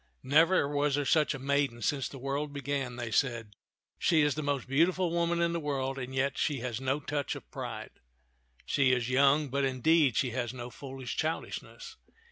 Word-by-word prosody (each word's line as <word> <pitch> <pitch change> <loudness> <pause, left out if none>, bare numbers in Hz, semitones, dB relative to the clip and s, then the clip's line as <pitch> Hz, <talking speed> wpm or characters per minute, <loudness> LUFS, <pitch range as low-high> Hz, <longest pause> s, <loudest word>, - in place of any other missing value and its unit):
" - - -43
Never 160 +3 +4
was 145 0 +1
there 145 -1 -1
such 150 +2 +3
a - - -5
maiden 135 -3 0
since 135 0 0
the 140 - -9
world 140 +3 -3
be 140 0 -6
gan," 135 -2 -2
they 120 -2 -5
said. 115 -5 0 0.2
" - - -64
She 160 -2 +3
is 150 -1 +3
the 155 - -3
most 145 -3 -2
beautiful 170 +6 +2
woman 170 0 +1
in 170 0 +1
the 170 - -1
world, 135 -3 -2
and 130 +1 -6
yet 135 +1 0
she 145 -3 +1
has 120 -1 -4
no 135 +2 0
touch 145 0 -3
of - - -11
pride. - - -6 0.7
She 135 -2 +3
is 125 0 0
young, 140 +2 +4
but, 140 +2 0
indeed, 135 +1 +3
she 125 - +1
has 125 0 -3
no 120 0 -7
foolish 135 -1 -7
childishness. 445 - -4
140 Hz, 205 wpm, -30 LUFS, 130-150 Hz, 0.7 s, Never